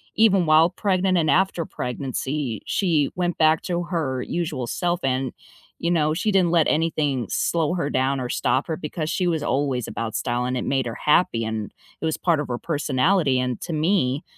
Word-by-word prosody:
even 195 Hz, -6 st, +4 dB
while 160 Hz, +2 st, +5 dB
pregnant 185 Hz, -1 st, +1 dB
and 155 Hz, -2 st, +1 dB
after 185 Hz, -2 st, +2 dB
pregnancy, 130 Hz, -1 st, -3 dB
she 160 Hz, -7 st, +1 dB
went 175 Hz, -1 st, -1 dB
back 155 Hz, 0 st, +4 dB
to 175 Hz, -1 st, -2 dB
her 160 Hz, -7 st, -2 dB
usual 165 Hz, -7 st, -3 dB
self 175 Hz, +6 st, -1 dB
and, 130 Hz, -1 st, 0 dB, 0.5 s
you 170 Hz, -, -2 dB
know, 155 Hz, -3 st, +2 dB
she 210 Hz, +6 st, 0 dB
didn't 185 Hz, -4 st, +3 dB
let 165 Hz, -3 st, +3 dB
anything 150 Hz, -6 st, 0 dB
slow 165 Hz, -1 st, 0 dB
her 170 Hz, -5 st, -1 dB
down 135 Hz, 0 st, 0 dB
or 125 Hz, -, -3 dB
stop 130 Hz, +2 st, 0 dB
her 160 Hz, -, -2 dB
because 155 Hz, -1 st, -4 dB
she 180 Hz, +1 st, 0 dB
was 165 Hz, -3 st, 0 dB
always 135 Hz, -4 st, -1 dB
about 115 Hz, -1 st, -4 dB
style, 120 Hz, +2 st, -1 dB
and 125 Hz, 0 st, -1 dB
it -, -, -3 dB
made 135 Hz, -2 st, 0 dB
her 115 Hz, -1 st, -4 dB
happy, 150 Hz, -7 st, +2 dB
and 110 Hz, -1 st, -4 dB, 0.3 s
it -, -, -2 dB
was 160 Hz, -, 0 dB
part 170 Hz, -4 st, +1 dB
of 150 Hz, -, -5 dB
her 120 Hz, -, -2 dB
personality. 145 Hz, 0 st, +1 dB
And 125 Hz, -2 st, -2 dB
to 175 Hz, -, -5 dB
me, 155 Hz, -4 st, +1 dB
155 Hz, 195 wpm, -23 LUFS, 130-175 Hz, 0.5 s, while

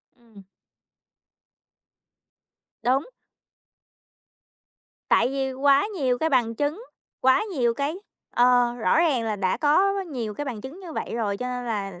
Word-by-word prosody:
Ừm. 225 Hz, -5 st, -18 dB, 2.4 s
Đúng. 260 Hz, +4 st, +2 dB, 2.1 s
Tại -, -, +4 dB
vì 270 Hz, -1 st, -2 dB
quá 275 Hz, +6 st, +3 dB
nhiều 255 Hz, -5 st, +1 dB
cái 320 Hz, -, +1 dB
bằng 240 Hz, -4 st, +2 dB
chứng, 295 Hz, -, -2 dB, 0.4 s
quá 260 Hz, +9 st, +4 dB
nhiều 240 Hz, -4 st, +1 dB
cái 285 Hz, +6 st, -2 dB, 0.4 s
ờ, 245 Hz, -1 st, +4 dB
rõ 240 Hz, +6 st, +1 dB
ràng 300 Hz, -8 st, +2 dB
là 215 Hz, -2 st, -2 dB
đã 190 Hz, -2 st, 0 dB
có 370 Hz, +7 st, +3 dB
quá 390 Hz, -, -1 dB
nhiều 240 Hz, -, -5 dB
cái 290 Hz, -, -4 dB
bằng 240 Hz, -7 st, -5 dB
chứng 280 Hz, -, -9 dB
như 350 Hz, -4 st, -9 dB
vậy -, -, -4 dB
rồi 210 Hz, -4 st, -1 dB
cho 250 Hz, +5 st, -4 dB
nên 250 Hz, 0 st, -4 dB
là 195 Hz, -5 st, -4 dB
250 Hz, 145 wpm, -25 LUFS, 230-290 Hz, 2.4 s, Tại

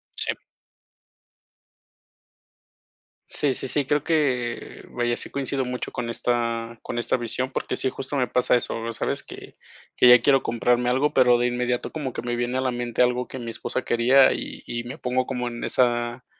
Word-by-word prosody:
Sí. -, -, -1 dB, 2.9 s
Sí, 145 Hz, -3 st, +1 dB
sí, -, -, -2 dB
sí, 145 Hz, +2 st, +1 dB
creo 145 Hz, +2 st, +1 dB
que 130 Hz, -8 st, -1 dB
vaya, 120 Hz, 0 st, -1 dB
sí -, -, -6 dB
coincido 135 Hz, -1 st, -2 dB
mucho 125 Hz, 0 st, -4 dB
con 120 Hz, -1 st, -4 dB
esta 115 Hz, -1 st, -2 dB
con 120 Hz, -, -6 dB
esta 120 Hz, -, 0 dB
visión, 125 Hz, +2 st, -3 dB
porque -, -, -3 dB
sí, 130 Hz, -, 0 dB
justo 135 Hz, +2 st, -6 dB
me 130 Hz, -3 st, +1 dB
pasa 125 Hz, 0 st, +2 dB
eso, 115 Hz, -1 st, -2 dB
sabes 105 Hz, -, -2 dB
que -, -, -12 dB, 0.4 s
que -, -, +5 dB
ya 125 Hz, 0 st, +9 dB
quiero 135 Hz, +1 st, +4 dB
comprarme 120 Hz, +1 st, +1 dB
algo, 135 Hz, +4 st, +1 dB
pero, 125 Hz, -2 st, +5 dB
de 120 Hz, -, +1 dB
inmediato 125 Hz, 0 st, -1 dB
como 145 Hz, -5 st, -4 dB
que -, -, -6 dB
me 120 Hz, 0 st, -2 dB
viene 120 Hz, +1 st, -1 dB
a -, -, 0 dB
la 130 Hz, -1 st, 0 dB
mente 120 Hz, -1 st, -2 dB
algo 125 Hz, 0 st, 0 dB
que -, -, -8 dB
mi 115 Hz, -1 st, -5 dB
esposa 130 Hz, -, -3 dB
quería 125 Hz, +3 st, +5 dB
y -, -, -6 dB
y 120 Hz, 0 st, -4 dB
me 120 Hz, +2 st, -7 dB
pongo 125 Hz, +1 st, -1 dB
como 125 Hz, -2 st, -2 dB
en 120 Hz, 0 st, -6 dB
esa 120 Hz, 0 st, 0 dB
125 Hz, 185 wpm, -24 LUFS, 120-130 Hz, 2.9 s, ya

